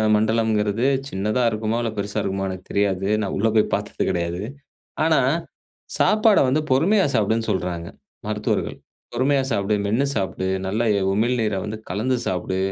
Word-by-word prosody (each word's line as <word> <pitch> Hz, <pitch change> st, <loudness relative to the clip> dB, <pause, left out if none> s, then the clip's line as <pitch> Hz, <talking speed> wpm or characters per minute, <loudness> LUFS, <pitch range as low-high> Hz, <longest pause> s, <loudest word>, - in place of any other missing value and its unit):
மண்டலம்ங்குறது, 110 Hz, 0 st, +1 dB, 0.2 s
சின்னதா 105 Hz, +1 st, -1 dB
இருக்குமோ 110 Hz, +1 st, -2 dB
இல்ல 115 Hz, -, -1 dB
பெருசா 100 Hz, 0 st, -3 dB
இருக்குமோ 95 Hz, 0 st, -2 dB
எனக்கு 95 Hz, 0 st, -7 dB
தெரியாது. 95 Hz, -1 st, +1 dB
நான் 100 Hz, -, -2 dB
உள்ள 110 Hz, -, +2 dB
போய் 110 Hz, -, +5 dB
பார்த்தது -, -, -1 dB
கிடையாது. 85 Hz, +1 st, -2 dB, 0.6 s
ஆனா, 160 Hz, -2 st, +4 dB, 0.8 s
சாப்பாட 215 Hz, -1 st, +4 dB
வந்து 145 Hz, +4 st, +2 dB
பொறுமையா 185 Hz, +10 st, +4 dB
சாப்டுன்னு 110 Hz, +2 st, +1 dB
சொல்றாங்க 85 Hz, -2 st, -3 dB, 0.4 s
மருத்துவர்கள். 105 Hz, 0 st, -1 dB, 0.4 s
பொறுமையா 135 Hz, +3 st, +2 dB
சாப்டு, 100 Hz, -1 st, 0 dB
மென்னு 115 Hz, +7 st, +1 dB
சாப்டு, 95 Hz, -1 st, -2 dB, 0.2 s
நல்ல 105 Hz, +5 st, 0 dB, 0.3 s
உமிழ்நீரை 110 Hz, -2 st, +1 dB
வந்து 110 Hz, +1 st, -5 dB
கலந்து 115 Hz, +8 st, 0 dB
சாப்டு. 95 Hz, +1 st, -2 dB
105 Hz, 135 wpm, -22 LUFS, 95-120 Hz, 0.8 s, போய்